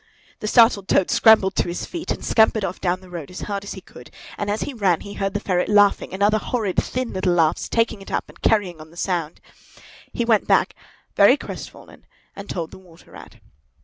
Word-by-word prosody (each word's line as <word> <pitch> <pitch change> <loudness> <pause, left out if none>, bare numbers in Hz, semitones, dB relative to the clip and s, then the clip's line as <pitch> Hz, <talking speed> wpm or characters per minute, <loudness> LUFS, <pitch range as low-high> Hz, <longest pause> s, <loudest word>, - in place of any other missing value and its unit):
The 215 - -4
startled 225 -4 +4
Toad 190 - +2
scrambled 215 -4 +5
to - - +1
his 175 +1 -4
feet 340 -1 -7
and - - -3
scampered 220 -2 +3
off 185 - -6
down 185 0 -1
the 185 - -15
road 165 -5 -7
as 180 - -9
hard 200 -1 -4
as 200 - -6
he 190 - -10
could; 125 - -15 0.3
and 205 - -4
as 210 +1 -1
he 285 - -4
ran 195 -8 +1
he 200 - -9
heard 195 0 -3
the - - +1
ferret 180 -3 -1
laughing 205 -1 +3
and 190 +2 -2
other 215 +1 +3
horrid 215 -5 -3
thin 255 -1 -2
little 185 -1 0
laughs 160 -2 +1
taking 230 -3 0
it 195 - -11
up - - -2
and - - -18
carrying 185 -7 +1
on 155 - -13
the 170 - -18
sound. 175 -4 -2 0.7
He 235 - -2
went 225 -3 +2
back, - - +3 0.4
very - - +6
crestfallen, - - -10 0.3
and 200 0 -10
told 165 -3 -4
the - - -12
Water 175 -3 -19
Rat. - - -13
195 Hz, 220 wpm, -22 LUFS, 180-215 Hz, 0.7 s, very